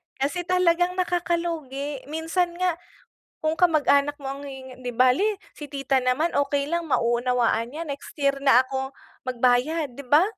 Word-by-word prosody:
Kasi 315 Hz, +6 st, -2 dB
talagang 360 Hz, 0 st, +2 dB
nakaka-lugi, 335 Hz, -6 st, -2 dB
minsan 325 Hz, +3 st, -1 dB
nga 360 Hz, -2 st, 0 dB, 0.6 s
kung 315 Hz, 0 st, 0 dB
kamag-anak 290 Hz, -4 st, +3 dB
mo 275 Hz, -, -7 dB
ang 280 Hz, -, -9 dB
hihing 260 Hz, -2 st, -10 dB
"'Di 245 Hz, -, -3 dB
bale, 280 Hz, -, +3 dB, 0.2 s
si 295 Hz, -1 st, -8 dB
tita 275 Hz, -1 st, 0 dB
naman 275 Hz, +7 st, +1 dB
okey 285 Hz, 0 st, +1 dB
lang 335 Hz, 0 st, -2 dB
mauunawaan 240 Hz, -2 st, +1 dB
niya, 320 Hz, +3 st, -5 dB
next 280 Hz, 0 st, -7 dB
year 275 Hz, -1 st, +2 dB
na 270 Hz, -3 st, +6 dB
ako 265 Hz, 0 st, -3 dB, 0.3 s
magbayad." 255 Hz, +3 st, +1 dB
'di 280 Hz, -, -9 dB
ba? 300 Hz, +5 st, +6 dB
285 Hz, 150 wpm, -25 LUFS, 260-335 Hz, 0.6 s, na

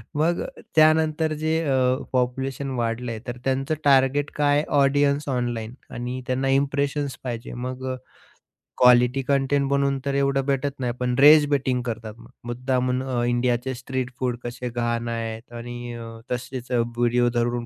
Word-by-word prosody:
मग 165 Hz, +4 st, +1 dB, 0.3 s
त्यानंतर 155 Hz, 0 st, +4 dB
जे 160 Hz, +1 st, +1 dB
अ, 135 Hz, -, +3 dB, 0.4 s
पॉप्युलेशन 130 Hz, +2 st, -1 dB
वाढलं 115 Hz, +1 st, -2 dB
आहे, 110 Hz, -, -5 dB
तर 120 Hz, 0 st, -4 dB
त्यांचं 135 Hz, +3 st, 0 dB
टार्गेट 140 Hz, +1 st, +3 dB
काय 145 Hz, 0 st, +3 dB, 0.2 s
ऑडियन्स 140 Hz, +1 st, +2 dB
ऑनलाईन 120 Hz, -3 st, -2 dB, 0.2 s
आणि 125 Hz, +1 st, -5 dB
त्यांना 130 Hz, +1 st, 0 dB
इम्प्रेशन्स 140 Hz, +1 st, 0 dB
पाहिजे. 120 Hz, -3 st, -5 dB
मग 125 Hz, +1 st, -5 dB
अ, -, -, -3 dB, 0.9 s
क्वालिटी 125 Hz, +1 st, +5 dB
कंटेंट 140 Hz, 0 st, +2 dB
बनवून 140 Hz, 0 st, +1 dB
तर 140 Hz, -, -1 dB
एवढं 140 Hz, 0 st, +2 dB
भेटत 140 Hz, 0 st, -1 dB
नाही, 125 Hz, -2 st, -1 dB
पण 125 Hz, -1 st, 0 dB
रेज 150 Hz, +1 st, +8 dB
बेटिंग 130 Hz, -3 st, +1 dB
करतात 115 Hz, -2 st, -5 dB
मग. -, -, -15 dB, 0.2 s
मुद्दामून 125 Hz, +1 st, 0 dB
अ, 125 Hz, -2 st, -1 dB
इंडियाचे 120 Hz, +1 st, 0 dB
स्ट्रीट 130 Hz, 0 st, -4 dB
फूड 125 Hz, -2 st, -1 dB
कसे 120 Hz, +1 st, -5 dB
घाण 120 Hz, 0 st, -2 dB
आहेत 115 Hz, +1 st, -5 dB
आणि 120 Hz, 0 st, -7 dB
अ, 115 Hz, -1 st, -7 dB, 0.2 s
तसेच 125 Hz, 0 st, -5 dB
अ, 125 Hz, -, +2 dB, 0.2 s
व्हिडिओ 120 Hz, 0 st, +3 dB
धरून 120 Hz, 0 st, -1 dB
130 Hz, 155 wpm, -24 LUFS, 120-140 Hz, 0.9 s, रेज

